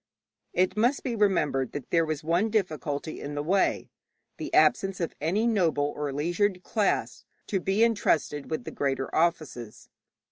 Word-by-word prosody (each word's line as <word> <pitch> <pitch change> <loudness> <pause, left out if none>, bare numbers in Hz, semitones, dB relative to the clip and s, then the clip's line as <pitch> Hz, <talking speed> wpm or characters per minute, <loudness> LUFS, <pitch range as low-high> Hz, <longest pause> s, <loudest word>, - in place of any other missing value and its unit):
It 185 +1 +2
must 240 +6 +2
be 245 -4 -2
remembered 150 - +1
that 145 - -7
there 165 -1 +3
was 155 -1 -3
one 170 +7 +1
difficulty 155 - -2
in 145 +1 -5
the 145 - -2
way 190 +5 +1 0.5
the - - -5
absence 195 -1 +3
of 170 - -2
any 190 +9 +1
noble 165 -10 +1
or 145 -1 -3
leisured 180 +6 0
class 215 -3 -1 0.2
to 195 - -1
be 195 +5 +2
entrusted 165 -10 +1
with 155 -5 -3
the - - -7
greater 135 -1 -2
offices. 155 -9 -1
170 Hz, 155 wpm, -27 LUFS, 145-200 Hz, 0.5 s, there